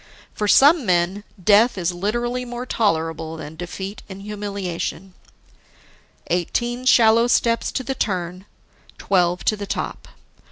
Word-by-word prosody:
For 210 Hz, -, -2 dB
some 290 Hz, +7 st, +6 dB
men, 185 Hz, +1 st, +1 dB, 0.2 s
death 210 Hz, +5 st, +4 dB
is 180 Hz, -1 st, 0 dB
literally 240 Hz, +7 st, -2 dB
more 245 Hz, 0 st, -6 dB
tolerable 165 Hz, -8 st, -1 dB
than 155 Hz, 0 st, -8 dB
defeat 190 Hz, +4 st, -6 dB
in 190 Hz, 0 st, -9 dB
humiliation. 200 Hz, -3 st, -5 dB, 1.1 s
Eighteen 240 Hz, +8 st, -2 dB
shallow 230 Hz, -1 st, +5 dB
steps 230 Hz, -1 st, +1 dB
to 260 Hz, -, -2 dB
the 270 Hz, -, -2 dB
turn, 185 Hz, -4 st, -3 dB, 0.5 s
twelve 180 Hz, -2 st, +1 dB
to 215 Hz, -, +3 dB
the 200 Hz, -1 st, -7 dB
top. -, -, -4 dB
200 Hz, 125 wpm, -21 LUFS, 175-235 Hz, 1.1 s, some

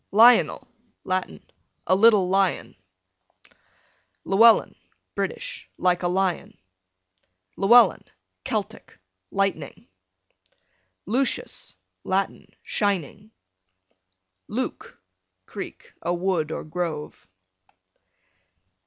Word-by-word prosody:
Lionel, 230 Hz, +4 st, +5 dB, 0.4 s
Latin, 185 Hz, 0 st, -3 dB, 0.4 s
a 185 Hz, -, +3 dB
little 205 Hz, -2 st, +5 dB
lion. 195 Hz, +1 st, 0 dB, 1.5 s
Llewellin, 225 Hz, +4 st, +5 dB, 0.4 s
British, -, -, -5 dB
like 180 Hz, -1 st, +1 dB
a 175 Hz, -, 0 dB
lion. 185 Hz, 0 st, -1 dB, 1.0 s
Llewellyn, 235 Hz, +5 st, +5 dB, 0.4 s
Celtic, -, -, -5 dB, 0.3 s
lightning. 195 Hz, -8 st, -3 dB, 1.2 s
Lucius, 250 Hz, +7 st, -2 dB, 0.3 s
Latin, 195 Hz, +1 st, -2 dB
shining. 200 Hz, 0 st, -2 dB, 1.2 s
Luke, -, -, -5 dB, 0.5 s
Creek, -, -, -9 dB
a 175 Hz, +2 st, -1 dB
wood 175 Hz, -4 st, -1 dB
or -, -, -4 dB
grove. 155 Hz, -2 st, -5 dB
195 Hz, 70 wpm, -24 LUFS, 175-210 Hz, 1.5 s, Lionel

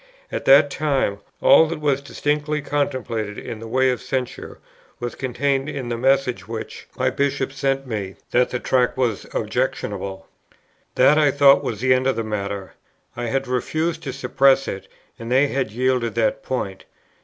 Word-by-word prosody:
At -, -, -4 dB
that 140 Hz, +1 st, +6 dB
time, 135 Hz, -10 st, 0 dB, 0.2 s
all 160 Hz, -, +7 dB
that 165 Hz, 0 st, -4 dB
was 140 Hz, -2 st, +1 dB
distinctly 150 Hz, +1 st, -1 dB
contemplated 120 Hz, -7 st, -2 dB
in 110 Hz, -, -7 dB
the 115 Hz, -, -8 dB
way 130 Hz, +3 st, +2 dB
of 125 Hz, -, -3 dB
censure, 130 Hz, -2 st, -4 dB, 0.4 s
was 120 Hz, 0 st, -4 dB
contained 135 Hz, +2 st, -1 dB
in 135 Hz, -5 st, -5 dB
the 120 Hz, -, -1 dB
message 135 Hz, 0 st, +1 dB
which 115 Hz, -1 st, -7 dB
my 130 Hz, 0 st, +1 dB
Bishop 140 Hz, 0 st, -1 dB
sent 135 Hz, 0 st, -1 dB
me, 105 Hz, -6 st, -4 dB, 0.2 s
that 125 Hz, +1 st, +3 dB
the 125 Hz, -, -2 dB
Tract 125 Hz, 0 st, +1 dB
was 120 Hz, -5 st, -1 dB
"objectionable." 95 Hz, -1 st, -3 dB, 0.7 s
That 145 Hz, +4 st, +5 dB
I 150 Hz, -2 st, +4 dB
thought 140 Hz, 0 st, +5 dB
was 110 Hz, -2 st, -4 dB
the 130 Hz, 0 st, +4 dB
end 130 Hz, +1 st, +1 dB
of 135 Hz, -, +2 dB
the 115 Hz, -, -2 dB
matter. 100 Hz, -2 st, -4 dB, 0.4 s
I 120 Hz, -, -4 dB
had 135 Hz, +2 st, -1 dB
refused 155 Hz, +6 st, -1 dB
to 140 Hz, -5 st, -4 dB
suppress 135 Hz, +1 st, +2 dB
it, 95 Hz, -, -5 dB, 0.3 s
and 115 Hz, +1 st, -6 dB
they 135 Hz, +3 st, +4 dB
had 135 Hz, -4 st, -1 dB
yielded 125 Hz, 0 st, 0 dB
that -, -, +1 dB
point. -, -, -4 dB
130 Hz, 170 wpm, -22 LUFS, 120-140 Hz, 0.7 s, all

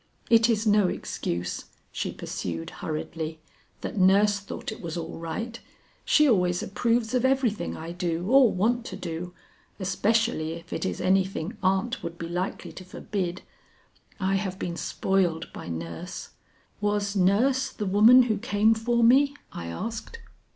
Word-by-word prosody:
It 230 Hz, 0 st, +6 dB
is 220 Hz, -1 st, +1 dB
no 210 Hz, -2 st, +4 dB
excuse," 85 Hz, -, -3 dB, 0.3 s
she -, -, -3 dB
pursued 80 Hz, -1 st, -5 dB
hurriedly, 160 Hz, 0 st, -5 dB, 0.4 s
"that 210 Hz, -, -4 dB
nurse 200 Hz, +2 st, +5 dB
thought 200 Hz, +2 st, -6 dB
it 220 Hz, -, -8 dB
was 170 Hz, 0 st, -5 dB
all 165 Hz, -1 st, -5 dB
right. 225 Hz, +8 st, -5 dB, 0.4 s
She 300 Hz, -1 st, +5 dB
always 180 Hz, -7 st, +2 dB
approves 230 Hz, +3 st, 0 dB
of 250 Hz, -1 st, +2 dB
everything 260 Hz, -8 st, +1 dB
I 165 Hz, +1 st, -6 dB
do 175 Hz, -1 st, -2 dB
or 255 Hz, 0 st, +6 dB
want 230 Hz, +6 st, +1 dB
to 185 Hz, -, -6 dB
do, 175 Hz, -1 st, -6 dB, 0.4 s
especially 195 Hz, -3 st, +1 dB
if 170 Hz, +1 st, -9 dB
it -, -, -1 dB
is -, -, -4 dB
anything 190 Hz, +1 st, +1 dB
aunt 195 Hz, +7 st, +1 dB
would 170 Hz, 0 st, -6 dB
be 165 Hz, -, -5 dB
likely 175 Hz, +2 st, -3 dB
to 185 Hz, -, -10 dB
forbid. 185 Hz, -1 st, -4 dB, 0.8 s
I 195 Hz, 0 st, +1 dB
have 190 Hz, -1 st, -3 dB
been 175 Hz, -3 st, -4 dB
spoiled 175 Hz, -3 st, 0 dB
by -, -, -8 dB
nurse." 85 Hz, 0 st, -6 dB, 0.5 s
"Was 205 Hz, -1 st, 0 dB
nurse 230 Hz, +9 st, +3 dB
the 210 Hz, -, -4 dB
woman 220 Hz, +6 st, +7 dB
who 220 Hz, -4 st, 0 dB
came 220 Hz, -1 st, +3 dB
for 235 Hz, +1 st, +1 dB
me?" 275 Hz, +4 st, +5 dB, 0.2 s
I 85 Hz, -, -6 dB
asked. 225 Hz, -, -5 dB
195 Hz, 150 wpm, -26 LUFS, 170-225 Hz, 0.8 s, woman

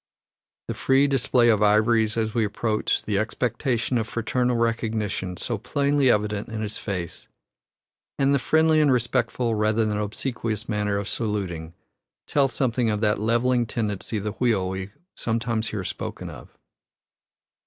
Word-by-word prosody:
The -, -, -2 dB
free 135 Hz, +1 st, +3 dB
display 125 Hz, -3 st, +3 dB
of 110 Hz, -2 st, +3 dB
ivories 110 Hz, +1 st, +3 dB
as 110 Hz, -1 st, 0 dB
we 115 Hz, -2 st, +2 dB
approach, 105 Hz, +1 st, 0 dB
the 100 Hz, -2 st, 0 dB
expectation 120 Hz, +2 st, -1 dB
of 110 Hz, -, -2 dB
fraternal 120 Hz, +2 st, 0 dB
recognition 110 Hz, -5 st, -1 dB
so 115 Hz, -4 st, -3 dB
plainly 140 Hz, +3 st, +2 dB
evident 105 Hz, -1 st, 0 dB
in 110 Hz, -1 st, -4 dB
his 105 Hz, 0 st, -4 dB
face, 90 Hz, -5 st, -5 dB, 0.9 s
and 140 Hz, 0 st, +3 dB
the 140 Hz, -, +3 dB
friendly 160 Hz, +3 st, +3 dB
and 145 Hz, -2 st, +4 dB
respectful, 120 Hz, -1 st, 0 dB
rather 110 Hz, +1 st, +2 dB
than 105 Hz, -1 st, -1 dB
obsequious, 110 Hz, 0 st, -3 dB
manner 105 Hz, -2 st, 0 dB
of 100 Hz, 0 st, -3 dB
saluting, 90 Hz, -8 st, -3 dB, 0.5 s
tell 140 Hz, -2 st, +2 dB
something 125 Hz, -3 st, 0 dB
of 105 Hz, -1 st, -1 dB
that 105 Hz, -2 st, +2 dB
levelling 120 Hz, +2 st, +2 dB
tendency 105 Hz, -1 st, -2 dB
of 100 Hz, -, -4 dB
the 105 Hz, -, -2 dB
wheel 110 Hz, -5 st, +1 dB
we 95 Hz, +1 st, -4 dB, 0.3 s
sometimes 115 Hz, -1 st, -1 dB
hear 100 Hz, -3 st, -3 dB
spoken -, -, -5 dB
of. -, -, -13 dB
110 Hz, 150 wpm, -24 LUFS, 105-120 Hz, 0.9 s, and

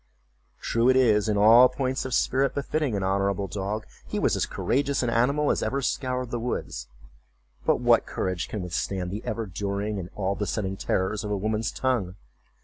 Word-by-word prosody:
True 115 Hz, +2 st, +1 dB
it 130 Hz, -, +5 dB
is, 110 Hz, -5 st, +4 dB
in 105 Hz, -, +1 dB
all 115 Hz, +5 st, +8 dB
points 130 Hz, 0 st, -2 dB
of 130 Hz, -, -1 dB
spirit 135 Hz, +2 st, +1 dB
befitting 140 Hz, -3 st, -1 dB
an 100 Hz, -, -1 dB
honorable 100 Hz, +1 st, 0 dB
dog, 100 Hz, +4 st, -3 dB, 0.2 s
he -, -, -3 dB
was -, -, +2 dB
as -, -, 0 dB
courageous 140 Hz, +1 st, 0 dB
an 120 Hz, -, 0 dB
animal 140 Hz, +6 st, +2 dB
as -, -, 0 dB
ever 140 Hz, -, -1 dB
scoured 125 Hz, -1 st, -2 dB
the 120 Hz, -, -2 dB
woods—but -, -, -5 dB
what -, -, +3 dB
courage 90 Hz, -2 st, -2 dB
can 105 Hz, -4 st, -4 dB
withstand 90 Hz, +1 st, -3 dB
the 105 Hz, +3 st, -5 dB
ever 115 Hz, -, -3 dB
during 100 Hz, +2 st, -3 dB
and 90 Hz, -1 st, -6 dB
all 100 Hz, -1 st, -1 dB
besetting 100 Hz, -1 st, -2 dB
terrors 95 Hz, +2 st, -1 dB
of 105 Hz, -, -4 dB
a 105 Hz, -, 0 dB
woman's 110 Hz, +3 st, -1 dB
tongue? 115 Hz, -9 st, -1 dB
105 Hz, 180 wpm, -26 LUFS, 95-125 Hz, 0.2 s, all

